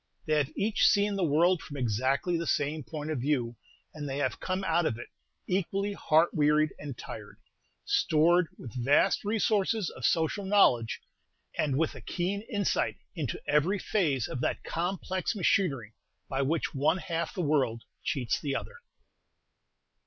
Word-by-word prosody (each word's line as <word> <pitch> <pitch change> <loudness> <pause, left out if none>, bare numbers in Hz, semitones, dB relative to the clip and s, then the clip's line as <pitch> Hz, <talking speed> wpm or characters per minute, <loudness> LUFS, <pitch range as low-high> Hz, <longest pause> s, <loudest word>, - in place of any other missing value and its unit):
They 155 - 0
have 140 -1 0
each 210 +1 +3
seen 205 0 +3
the 195 - 0
world 170 +3 +3
from 145 - -8
exactly 130 - 0
the 165 -1 -2
same 150 +1 0
point 155 +2 -5
of 150 - -1
view, 125 -4 0 0.4
and 145 -2 -5
they 135 - -3
have 145 - -1
come 185 +1 -2
out 170 -2 +2
of 110 - -2
it 120 - -9 0.4
equally 195 +2 -1
heart 160 -3 +3
wearied 150 0 +3
and 140 -4 -7
tired, - - -9 0.5
stored 170 +3 +3
with 120 - -9
vast 140 +4 +3
resources 210 -2 +1
of - - -11
social 165 +5 +1
knowledge, 160 - +3 0.5
and 140 -3 0
with 160 +1 +1
a - - -10
keen 190 +3 -2
insight 205 -5 0 0.2
into 155 -8 -3
every 155 +7 +2
phase 160 - 0
of 125 - -5
that - - -1
complex 185 +3 -2
machinery 145 - +1 0.3
by 135 0 -1
which 155 +4 0
one 155 +5 +2
half 170 -1 -3
the 180 - -1
world 130 -7 +1 0.2
cheats 125 -5 -1
the 140 -2 -2
other. 475 - -5
155 Hz, 160 wpm, -29 LUFS, 140-185 Hz, 0.5 s, each